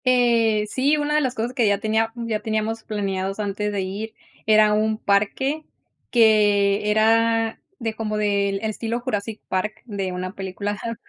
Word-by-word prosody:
Eh, 235 -4 +3
sí, 275 +7 +1
una 295 0 -1
de 300 - +3
las 260 -2 -1
cosas 235 +2 -2
que 240 -4 +2
ya 200 0 +3
tenía 220 +2 0
ya 230 -2 -2
teníamos 220 +1 -2
planeados 195 -2 -3
antes 210 0 -2
de 200 -1 -1
ir 200 +4 -5 0.3
era 215 -1 +5
un 215 +1 +1
parque, 235 +10 0 0.5
que 210 -3 +4
era 225 +1 +2 0.2
de 225 -2 -3
como 215 -1 -3
del 200 -1 +1
estilo 225 +2 -2
Jurassic 220 -3 -3
Park, 210 +3 -2
de 200 -5 -3
una 185 +1 -5
película 195 +1 -4
ajá, 230 +3 -5
215 Hz, 160 wpm, -23 LUFS, 205-230 Hz, 0.5 s, era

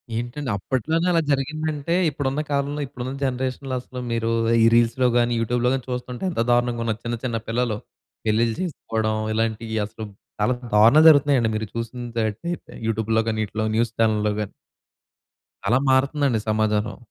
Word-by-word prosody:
ఏంటండి? 120 +4 -4
అప్పట్లోనే 160 - -1
అలా 165 -1 +3
జరిగిందంటే 155 +3 -1
ఇప్పుడున్న 140 0 -2
కాలంలో 140 +1 -1
ఇప్పుడున్న 130 0 -6
జనరేషన్‌లో 130 +1 -2
అసలు 130 0 -9
మీరు 115 0 0 0.3
ఈ - - +7
రీల్స్‌లో 120 +2 +3
గాని 120 0 +2
యూట్యూబ్‌లో 120 +2 +1
గాని 130 -2 -2
చూస్తుంటే 125 +3 -5
ఎంత 140 - -1
దారుణంగా 120 -1 +1
ఉన్న 115 - +1
చిన్న 120 0 -2
చిన్న 120 -3 -1
పిల్లలు 115 -1 0 0.5
పెళ్లిలు 115 +1 +2
చేసుకోవడం 110 -10 -2 0.2
ఇలాంటియ్యి 110 0 -1
అసలు 110 +1 -8 0.4
చాలా 125 +5 +3 0.2
దారుణాలు 115 +10 +7
జరుగుతున్నాయండి. 140 -6 +4
మీరు 110 0 -2
చూసినటైతే 115 +3 -3 0.4
యూట్యూబ్‌లో 110 0 +1
గాని 110 0 -1
ఈటిలో 110 +2 -3
న్యూస్ 115 0 +1
చానెల్‌లో 105 -2 +2
గాని. 105 -2 -4 1.2
అలా 120 - +4
మారుతుందండి 135 -2 +2
సమాజం. 110 0 0
120 Hz, 140 wpm, -23 LUFS, 110-135 Hz, 1.2 s, ఈ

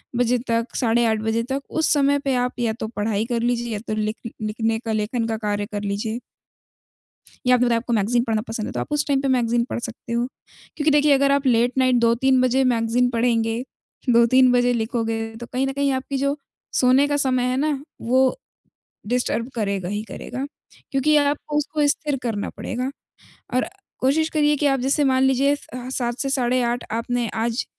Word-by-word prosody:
बजे 245 0 +2
तक, 230 +1 -1
साढ़े 235 0 +2
8 220 -1 +1
बजे 225 +1 0
तक, 275 +1 -1
उस 320 - +1
समय 285 0 +3
पे 275 -2 -1
आप 250 0 0
या 230 -2 +1
तो 220 - -3
पढ़ाई 210 0 0
कर 235 -1 -1
लीजिए 240 0 -1
या 205 - -3
तो 215 - -1
लिख 215 +1 -2 0.2
लिखने 225 +1 -1
का 225 -2 -4
लेखन 225 +2 -1
का 225 -1 -2
कार्य 205 -1 -2
कर 205 - -2
लीजिए। 210 +3 -2 1.3
या 250 0 +6
फिर 245 -1 +2
आपको 235 +1 -1
मैगज़ीन 230 +3 +2
पढ़ना 220 -2 0
पसंद 225 -1 -3
है, - - -5
तो - - -3
आप 295 - -5
उस 295 0 +1
टाइम 275 -2 +2
पे 275 - -1
मैगज़ीन 240 -2 +2
पढ़ - - -2
सकते 235 0 -7
हो। 235 +1 +1 0.5
क्योंकि 305 0 +2
देखिए, 295 0 +4
अगर 275 0 +3
आप 280 0 +1
लेट 245 0 +3
नाइट 255 -1 +4
2-3 255 +3 +3
बजे 255 +1 +3
मैगज़ीन 235 +1 +2
पढ़ेंगे, 230 -1 +1 0.5
2-3 245 +2 +5
बजे 245 0 +3
लिखोगे, 225 -1 -1 0.2
तो 240 - -8
कहीं 260 +2 0
न 270 - -2
कहीं 280 0 +1
आपकी 270 +1 -4
जो 280 +1 +1 0.4
सोने 260 +3 +5
का 290 - +1
समय 255 -3 +1
है 255 - 0
ना, 285 -1 0 0.2
वो 260 - +2 0.7
डिस्टर्ब 245 -1 0
करेगा 200 -5 -2
ही 205 +2 -2
करेगा, 260 - -5 0.5
क्योंकि 290 +3 +3
आपको 295 +1 0
उसको 295 0 +1
स्थिर 290 -1 0
करना 220 -4 -2
पड़ेगा। 255 +2 -3 0.6
और 255 +6 +1 0.3
कोशिश 315 +5 +2
करिए 295 -1 +2
कि 295 - -1
आप 270 -2 +3
जैसे 275 +3 +1
मान 265 -1 +3
लीजिए 270 +2 +3
स - - -13
अ, 250 0 -6
7 240 -2 -2
से 275 - -1
साढ़े 255 -1 +1
8 240 +1 -1
आपने 235 +1 -1 0.2
आज 235 +1 -1
245 Hz, 200 wpm, -22 LUFS, 230-270 Hz, 1.3 s, या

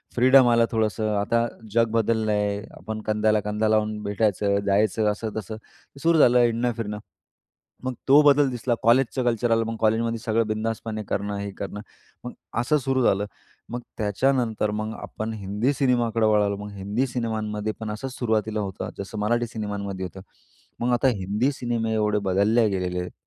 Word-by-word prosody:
Freedom 130 +1 +6
आलं 115 -1 +4
थोडंसं. 110 -1 0
आता 115 +3 +1 0.3
जग 115 0 +3
बदललंय 110 -2 +1 0.2
आपण 110 +3 -6
कंद्याला-कंदा 105 0 +1
लावून 110 0 +1
भेटायचं 100 -1 +1
जायचं 105 +1 +2
असं-तसं 110 0 -5 0.5
सुरू 165 0 +3
झालं 125 -3 +6
हिंडणं-फिरणं. 115 -3 0 0.8
मग 130 0 -2
तो 140 +2 +7
बदल 145 -1 +5
दिसला 120 0 -1
कॉलेजचं 130 +3 +3
कल्चर 120 0 +1
आलं, 115 0 +3
मग 115 0 -3
कॉलेजमध्ये 115 +1 +1
सगळं 110 0 0
बिंदासपणे 110 0 -3
करणं 100 0 -2
हे 100 0 -4
करणं 100 +1 -5 0.4
मग 125 - -5 0.3
असं 150 +5 +2
सुरू 130 -1 0
झालं. 100 -2 +2 0.4
मग 120 - -4 0.2
त्याच्यानंतर 110 0 0
मग 110 +1 -3
आपण 110 +1 -5
हिंदी 105 +6 -1
सिनेमाकडं 120 -5 +1
वळालो, 105 -1 +2
मग 105 +1 -7
हिंदी 100 +7 -1
सिनेमांमध्ये 110 -3 -3
पण 110 -1 -4
असंच 125 +5 -5
सुरुवातीला 110 -2 0
होतं, 95 -3 -4
जसं 100 +2 -6
मराठी 120 +3 +1
सिनेमांमध्ये 100 -4 -4
होतं. 95 +1 -9 0.6
मग 120 +1 +1
आता 120 +2 +3
हिंदी 105 +8 0
सिनेमे 115 -3 -2
एवढे 105 -1 +1
बदलले 110 +5 +3
गेलेले 90 -2 -2
आहेत, 90 0 -5
110 Hz, 150 wpm, -24 LUFS, 105-120 Hz, 0.8 s, तो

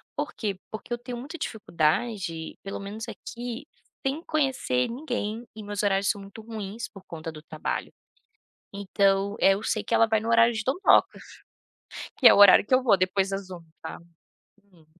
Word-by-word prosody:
Por - - -3
quê? 200 -4 -3
Porque 215 +3 -8
eu - - -1
tenho 245 0 -7
muita 290 +7 -7
dificuldade, 170 - -1
pelo 195 - -5
menos 210 +3 -6
aqui, 240 +4 -7 0.4
sem 280 +4 -1
conhecer 265 - 0
ninguém 240 -3 -4
e 215 - -8
meus 205 0 -3
horários 195 0 +2
são 200 - -1
muito 200 +3 -11
ruins 220 0 -6
por 195 -2 -14
conta 165 -1 -7
do 155 -1 -11
trabalho. 155 -1 -4 0.8
Então, 200 0 +1
eh, 195 - +6
eu 205 +2 -4
sei 215 -2 -1
que 230 - -4
ela 225 - +5
vai 220 -1 +2
no 225 +2 -4
horário 230 0 +5
de 220 -1 -3
dondocas, 280 - +3 1.0
que - - +5
é - - +7
o - - +3
horário 205 0 +8
que 255 - +3
eu 255 - +4
vou 225 -6 +5
depois 190 +1 +1
das 195 -1 -4
1h, 175 -2 -8 0.2
tá? - - -7 0.7
Hum. 175 -6 -24
205 Hz, 185 wpm, -26 LUFS, 195-235 Hz, 1.0 s, horário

